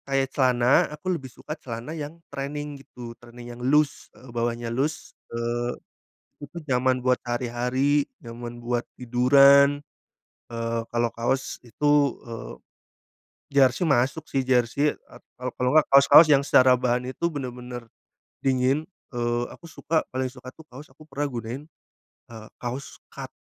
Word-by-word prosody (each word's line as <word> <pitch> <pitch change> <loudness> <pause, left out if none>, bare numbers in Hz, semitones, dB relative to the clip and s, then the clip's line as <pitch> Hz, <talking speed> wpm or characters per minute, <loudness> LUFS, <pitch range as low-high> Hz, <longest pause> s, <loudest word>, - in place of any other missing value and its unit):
Kayak 135 -1 +1
celana, 125 -2 +3
aku 185 +4 -2
lebih 135 -6 -5
suka 150 - -8
celana 120 +5 -6
yang 155 0 -6 0.2
training 145 +1 -5
gitu, 120 -3 -10
training 120 0 -11
yang 120 - -11
loose, 145 +3 +1
eee, 125 -2 -14
bawahnya 120 0 -2
loose, 145 +5 -2 0.2
eee, 120 +1 -2 0.7
itu 145 +4 -10
nyaman 130 -1 +2
buat 125 0 +2
hari-hari, 125 +4 0 0.2
nyaman 120 0 -8
buat 120 0 -2 0.2
tiduran. 140 +3 +5 0.7
Eee, 115 0 -2
kalau 120 0 0
kaos 125 +3 -2
itu, 120 +5 -4 0.4
eee, 115 -1 -7 1.0
jersei 135 +1 +3
masuk 135 +4 +2
sih, 135 -1 -1
jersei, 130 +3 +2
eee, - - -18
kalau 125 0 -5
kalau 125 - +1
nggak 155 -1 +6
kaos-kaos 140 +3 +8
yang 140 -1 +4
secara 130 -2 +5
bahan 125 0 0
itu 150 - -2
bener-bener 125 -2 -6 0.6
dingin. 135 +2 +2 0.3
Eee, 120 0 0
aku 170 - -14
suka, 160 0 -1
paling 130 0 -2
suka 130 0 -11
tuh 160 +4 -17
kaos 145 +2 -13
aku 150 +4 -18
pernah 145 -1 -3
gunain, 120 +2 -5 0.6
eee, 110 -2 -11
kaos 125 +3 -6 0.2
cot - - -7
125 Hz, 145 wpm, -25 LUFS, 120-140 Hz, 1.0 s, kaos-kaos